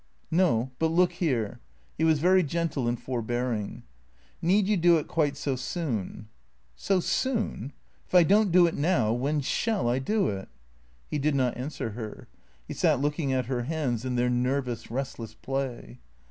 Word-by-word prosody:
"No. 145 -8 +2
But 160 - +3
look 175 +2 +3
here 135 - -1 0.2
" 65 +2 -36
He - - +1
was 160 -1 +4
very 185 +5 +4
gentle 160 -5 -1
and 120 0 -1
for 125 -2 -3
bearing. 120 -2 -3 0.3
" - - -34
Need 190 +4 +3
you 210 - +3
do 175 -2 +5
it 150 - -3
quite 145 -3 0
so 140 -2 -1
soon? 125 - -4
" 60 - -41
" - - -38
So 195 -2 +4
soon? 180 - -1 0.4
If - - -4
I 180 - +8
don't 200 +3 +4
do 175 0 +6
it 165 - 0
now, 145 -8 +2
when 140 +5 0
shall 210 - 0
I 120 +2 +1
do 205 +8 +1
it? 95 -1 -5 0.3
" 60 0 -34
He 150 - 0
did 145 +1 +1
not 130 -3 +1
answer 125 -2 -4
her. 110 -1 -8 0.4
He - - -5
sat - - +2
looking 145 0 -1
at 130 -1 0
her 120 -1 -2
hands 135 -6 -1
in 130 -1 -2
their 120 0 +2
nervous, 125 -1 -1
restless 125 -2 -5
play. 135 -2 -4
135 Hz, 190 wpm, -27 LUFS, 120-170 Hz, 0.4 s, I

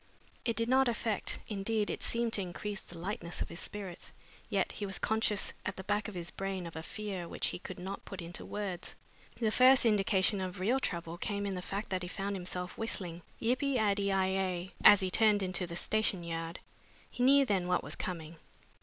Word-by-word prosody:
It 230 - +1
did 230 0 0
not 265 +1 +5
affect 225 -3 -1
indeed, 210 +1 0
it - - -4
seemed 235 -1 0
to 200 - +3
increase 195 +2 -4
the 175 - -12
lightness 175 -1 -4
of - - -2
his 170 - -6
spirits, 195 -4 -6 0.4
yet 200 -3 +1
he 210 - -4
was 195 - 0
conscious 220 -2 +2
at - - -3
the 190 - -7
back 205 +1 0
of 210 - -7
his 175 -1 -3
brain 195 -2 -3
of 165 - -8
a 160 - -4
fear 195 -1 -5
which - - -1
he - - -5
could 185 - -7
not 190 +2 -5
put 195 - -8
into 170 0 -5
words. 200 -4 -4 0.4
The 220 -3 +2
first 255 +2 +7
indication 200 -2 +3
of 185 0 -4
real 230 +8 +2
trouble 170 -6 -3
came 205 0 -2
in 200 - -1
the 180 - -3
fact 200 +3 -4
that 185 -1 0
he 180 - -4
found 200 +2 -3
himself 180 -1 -5
whistling 180 -6 -2 0.2
"Yip 245 +3 +1
i 275 -1 +1
addy 200 -3 +2
i 190 -1 +3
ay" 185 -1 -1
as 205 - +10
he 185 -1 0
turned 210 -1 +4
into 185 -1 0
the 170 - -6
station 200 -1 0
yard. 165 0 -4 0.5
He - - -5
knew 275 +2 +7
then 190 -6 +1
what 180 0 +2
was 145 - -4
coming. 165 -2 -5
195 Hz, 215 wpm, -33 LUFS, 180-215 Hz, 0.5 s, as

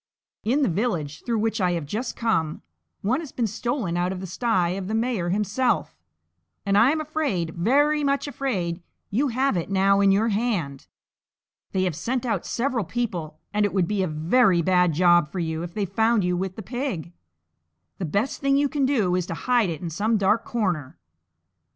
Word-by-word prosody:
In 270 +7 +2
the - - +3
village 170 -7 -2
through 235 -2 0
which 220 0 0
I 180 -1 +2
have 165 -3 -2
just 220 - -4
come, 165 -10 -1 0.4
one 240 +8 +1
has 315 -5 -7
been 240 - -1
stolen 220 -3 -2
out 175 +1 0
of 190 - -4
the 190 - -5
sty 185 -1 0
of 185 +1 -3
the 215 - -1
mayor 225 -6 0
himself; 210 +6 0 0.7
and 200 0 +2
I 225 +5 +6
am 315 +2 +1
afraid, 275 - -1
very 290 - +2
much 280 +1 0
afraid, 190 -12 -2 0.3
you 260 +9 +2
have 260 -1 +1
it 170 0 -2
now 195 0 +3
in 200 -1 +5
your 215 +4 +3
hand! 200 - -2 0.8
They 190 -1 0
have 180 -4 -1
sent 245 - -2
out 230 - -1
several 245 -2 -1
people, 175 -8 -3 0.2
and 210 0 +2
it 205 - 0
would 180 -3 +2
be 205 0 0
a 185 - +1
very 170 +4 +3
bad 180 0 +3
job 175 -1 +4
for - - -6
you 160 -2 -2
if 170 0 -7
they 210 -2 0
found 220 +3 +2
you 180 0 +1
with 185 +1 -3
the 220 - -7
pig; 220 - -4 0.9
the - - -3
best 200 - -1
thing 275 0 +3
you 285 0 +2
can 280 -2 +1
do 220 -10 +1
is 180 -1 0
to 165 - -4
hide 240 -1 +2
it 160 -3 -5
in 170 -2 -4
some 215 +7 +1
dark 210 +3 +2
corner!" 175 - -2
200 Hz, 200 wpm, -24 LUFS, 175-240 Hz, 0.9 s, I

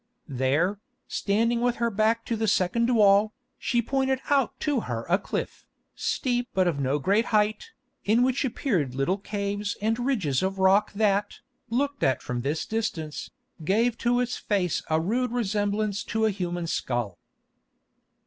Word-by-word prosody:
There, 145 +9 0 0.3
standing 230 +4 +1
with 245 0 +1
her 235 0 0
back 220 +2 +1
to 230 - -1
the 220 0 -1
second 215 +5 +2
wall, 210 0 +5 0.3
she 240 -1 0
pointed 265 +1 0
out 275 -4 +2
to 290 -4 +1
her 115 - -4
a 180 +4 +3
cliff, - - -5 0.3
steep 245 -1 -1
but 185 -1 +3
of 160 -5 0
no 135 +1 +1
great 200 - +2
height, 215 - +1 0.3
in 225 +4 +3
which 260 +2 +1
appeared 200 - -1
little 155 +9 0
caves 205 0 -3
and 225 +3 0
ridges 210 - 0
of 190 +1 -1
rock 190 +2 +4
that, 205 -1 +1 0.3
looked 280 +4 -1
at 130 -1 +1
from 120 -1 -3
this 145 +5 -2
distance, 170 -9 -3 0.3
gave 225 +8 +2
to 245 +1 +2
its 250 -1 -1
face 185 -5 0
a 155 0 +2
rude 230 +8 0
resemblance 210 -2 -1
to 220 0 0
a 220 - +3
human 175 -3 -3
skull. 120 - -2
210 Hz, 160 wpm, -26 LUFS, 175-235 Hz, 0.3 s, wall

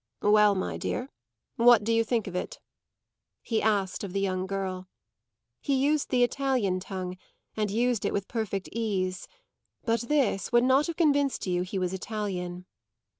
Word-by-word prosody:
"Well, 210 0 +5
my 185 - -2
dear, 255 +2 -3 0.5
what 235 -2 +6
do 230 +2 +1
you 230 0 +3
think 225 -1 0
of 190 - -7
it?" 180 - -4 0.9
he 225 -2 0
asked 200 -3 0
of 190 -3 -5
the 200 - 0
young 185 -1 -1
girl. 190 -1 -4 0.7
He 280 - 0
used 285 +3 +1
the 250 -2 +3
Italian 245 -8 +1
tongue, 185 -1 -5 0.4
and 215 -1 0
used 235 +1 +1
it - - 0
with 200 -1 -2
perfect 210 -5 -3
ease; 190 -5 -2 0.6
but 230 0 +1
this 240 -8 0
would 240 0 +5
not 265 +4 +4
have 335 - -3
convinced 285 -4 +2
you 180 -1 0
he 185 +2 -4
was 185 -1 -1
Italian. 185 -3 -4
210 Hz, 165 wpm, -28 LUFS, 190-245 Hz, 0.9 s, what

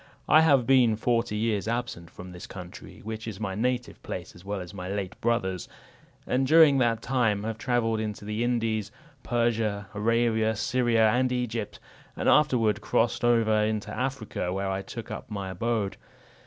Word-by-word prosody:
I 155 - +7
have 140 -6 +4
been 125 -4 +5
forty 115 -1 0
years 110 -2 0
absent 115 -8 -3
from 90 0 -10
this 90 +6 -9
country, 90 -4 -10
which 110 +1 -6
is 105 -3 -6
my 100 -3 -3
native 125 +4 -2
place, - - -6
as 90 - -15
well 100 0 -3
as 90 0 -8
my 90 -2 -6
late 100 -2 -3
brother's; 95 -6 -1 0.6
and 130 +1 +1
during 155 -3 +6
that 115 -2 +1
time 115 -6 +1
have 110 0 -4
travelled 115 -3 0
into 105 -1 -4
the 105 +2 -2
Indies, 115 -4 -1 0.3
Persia, 115 -4 0
Arabia, 110 +1 +1
Syria, 115 0 +2
and 125 +2 +1
Egypt, 120 -4 -3 0.4
and - - -2
afterward 115 -8 +3
crossed 115 +1 +1
over 115 -2 +3
into 110 -1 -2
Africa, 125 -8 -3
where 95 +1 -2
I 95 0 -2
took 110 +4 -8
up - - -7
my 100 -3 -4
abode. 105 +1 -1
110 Hz, 170 wpm, -27 LUFS, 100-120 Hz, 0.6 s, I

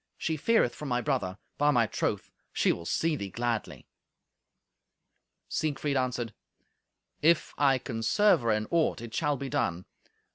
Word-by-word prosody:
She 160 - -1
feareth 155 - +2
for 150 - -7
my 125 -2 +1
brother; 125 -9 -1 0.2
by 145 +1 +4
my 120 -5 +4
troth, - - -2 0.2
she - - +2
will 85 - -5
see 165 -1 +1
thee 100 -8 -5
gladly." 120 +2 -3 1.6
Siegfried 145 -2 -1
answered, 125 -4 -1 0.9
"If 165 +1 +3
I 135 -2 +4
can 115 -2 -5
serve 205 - +4
her 115 - -1
in 110 0 +1
aught, 165 -2 +2
it 115 -1 -8
shall 150 +1 0
be 140 - -5
done. 90 -8 -1
130 Hz, 150 wpm, -29 LUFS, 115-150 Hz, 1.6 s, by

